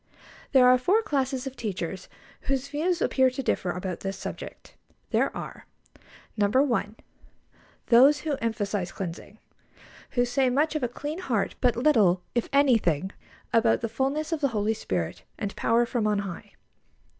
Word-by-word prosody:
There 260 -2 +6
are 250 0 +6
four 400 - +2
classes 270 -7 -1
of 265 -1 -6
teachers 190 -5 -5 0.4
whose 275 0 -1
views 335 +4 0
appear 260 -1 +3
to 255 +1 -5
differ 185 - -1
about 180 0 -4
this 195 0 -4
subject. - - -8 0.4
There - - +2
are: - - -8 0.7
1. 220 +1 +1 0.9
Those 265 +5 +6
who 305 -2 -1
emphasise 205 -5 -2
cleansing; 190 +3 -7 0.8
who 245 - +4
say 255 +1 +1
much 295 +6 +1
of 305 - -2
a 245 - +1
clean 295 +7 -6
heart, 240 - -1
but 245 -2 +3
little, 215 -10 +3
if 240 - -1
anything, 220 - +2 0.4
about 230 0 +3
the 230 - -1
fullness 275 +7 -1
of 320 -2 -1
the 280 - +3
Holy 210 +2 +1
Spirit 90 - -3 0.2
and 200 -1 -4
power 235 +1 +2
from 230 -3 -1
on 210 -1 +1
High. 195 -4 -6
240 Hz, 155 wpm, -26 LUFS, 205-275 Hz, 0.9 s, There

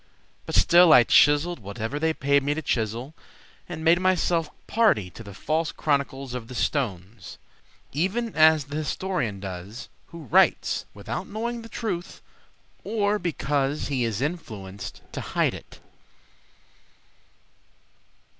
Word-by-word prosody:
But - - -3
still 175 -1 +6
I 125 - +8
chiseled 145 +8 +4
whatever 110 +7 -5
they 160 +1 +2
paid 140 -2 +2
me 145 +2 -1
to 160 - -4
chisel 120 +4 -2 0.6
And 160 - -6
made 165 +2 +5
myself 175 -3 +1 0.2
party 205 - +2
to - - -11
the 100 -4 -10
false 155 +5 -1
chronicles 140 -3 -2
Of 125 -2 -6
the 125 - -9
stones, 100 - -3 0.5
Even 195 - -1
as 155 -1 +6
the 145 +2 -5
historian 155 - -2
does 100 +5 -8 0.2
who 170 -1 -10
writes 125 - +2
Without 115 - -5
knowing 235 +3 -4
the 230 - -11
truth, 185 -8 -4 0.6
Or 210 0 0
because 145 -4 -1
he 130 -3 0
is 115 -1 -2
influenced 105 - -6
to - - -5
hide - - 0
it. - - -12
145 Hz, 130 wpm, -25 LUFS, 115-175 Hz, 0.6 s, I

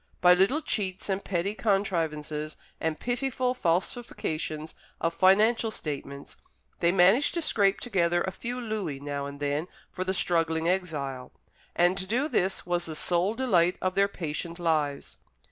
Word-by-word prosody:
By 180 0 +7
little 200 - +2
cheats, 195 -7 -2
and 195 0 -1
petty 190 +2 -1
contrivances, 160 -8 -1 0.2
and 160 -1 -2
pitiful 250 0 -1
falsifications 165 -6 -2 0.3
of 165 0 0
financial 215 +6 +4
statements, 140 -7 -6 0.4
they 170 - +3
managed 195 - +4
to 340 - 0
scrape 200 -7 +2
together 175 -6 +1
a 190 - -2
few 245 +6 -5
louis 210 - -3
now 140 0 -4
and 140 0 -9
then 145 +3 -1 0.2
for 185 - -3
the 190 +1 -1
struggling 165 -2 +1
exile; 145 -9 -2 0.4
and 175 +1 +4
to 190 - -5
do 250 +8 +1
this 190 - 0
was 175 0 -1
the 160 - -5
sole 180 +6 +1
delight 180 -9 +2
of 185 0 -1
their 200 +1 +3
patient 170 -2 -4
lives. 155 -5 -1
180 Hz, 150 wpm, -28 LUFS, 160-200 Hz, 0.4 s, By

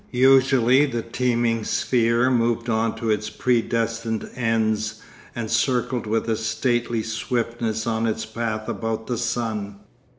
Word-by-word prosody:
Usually 130 +1 +4
the 120 -4 -3
teeming 115 -1 0
sphere 120 +2 +2
moved 115 -1 +1
on 110 0 0
to 115 -1 -1
its 105 0 -1
predestined 115 -2 -1
ends 110 -2 0 0.4
and 115 -2 -4
circled 120 0 0
with 115 +2 0
a 115 - +1
stately 115 +1 -1
swiftness 115 -1 -2
on 115 -1 0
its 110 0 -2
path 110 -1 -3
about 110 0 -3
the 120 -2 -2
sun. 110 -4 -2
115 Hz, 130 wpm, -23 LUFS, 110-120 Hz, 0.4 s, Usually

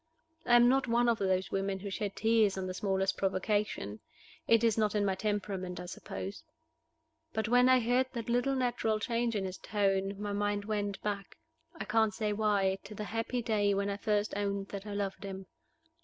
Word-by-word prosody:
I 240 - +6
am 240 0 +7
not 265 +1 +3
one 240 +1 +3
of 235 -1 +2
those 190 -1 0
women 195 0 -1
who 200 +1 -6
shed 205 0 -3
tears 220 -3 +3
on 190 - -2
the 185 - -3
smallest 195 -1 0
provocation: 195 - -1 0.5
it 230 0 +5
is 225 -2 +4
not 215 -1 +1
in 205 -1 +2
my 195 - +2
temperament, 190 -3 -3
I 180 - -6
suppose. 195 - -7 0.9
But 220 -1 -1
when 250 +2 +5
I 255 0 +6
heard 245 +2 +2
that 235 -3 -4
little 245 +3 +1
natural 240 -4 0
change 230 0 -1
in 195 -2 -1
his 185 0 -6
tone 195 -1 0
my 205 -1 -3
mind 205 0 -1
went 205 -2 -2
back 200 -1 -4 0.4
(I - - -5
can't 220 -2 +2
say 210 -2 -1
why) 200 -2 +1
to 210 - -9
the 210 - -4
happy 230 +3 -2
day 205 -3 +2
when 200 +1 0
I 200 - -3
first 210 0 0
owned 200 -1 -2
that 200 +1 -6
I 205 - -4
loved 200 0 -3
him. 190 -1 -6
205 Hz, 200 wpm, -31 LUFS, 195-225 Hz, 0.9 s, am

